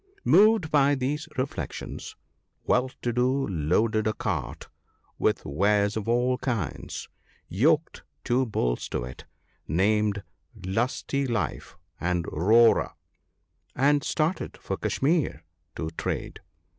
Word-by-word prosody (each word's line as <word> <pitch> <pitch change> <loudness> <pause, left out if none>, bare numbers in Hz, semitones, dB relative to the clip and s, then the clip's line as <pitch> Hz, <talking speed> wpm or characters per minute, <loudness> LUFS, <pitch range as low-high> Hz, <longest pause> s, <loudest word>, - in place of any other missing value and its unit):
Moved 210 -4 +5
by 145 -1 +4
these 145 +5 -2
reflections 130 +2 -4 0.5
Well 125 +1 +2
to 120 - 0
do 130 +3 +1
loaded 105 +6 +1
a 110 - +1
cart - - -3 0.5
with 105 - +1
wares 100 +7 +2
of 110 0 -3
all 125 +2 +2
kinds, 100 - -3 0.4
yoked 150 - +1 0.2
two 130 +1 +1
bulls - - -1
to - - -2
it, 65 +1 -9 0.4
named 100 +3 +1 0.4
Lusty 125 +7 -1
life 115 -7 -3 0.2
and 90 -1 0
Roarer, 110 +8 +4 0.8
and 145 +2 +3
started 160 +4 -1
for - - -4
Kashmir 140 - 0 0.3
to 80 -1 -4
trade. 80 - -4
115 Hz, 110 wpm, -26 LUFS, 95-135 Hz, 0.8 s, Moved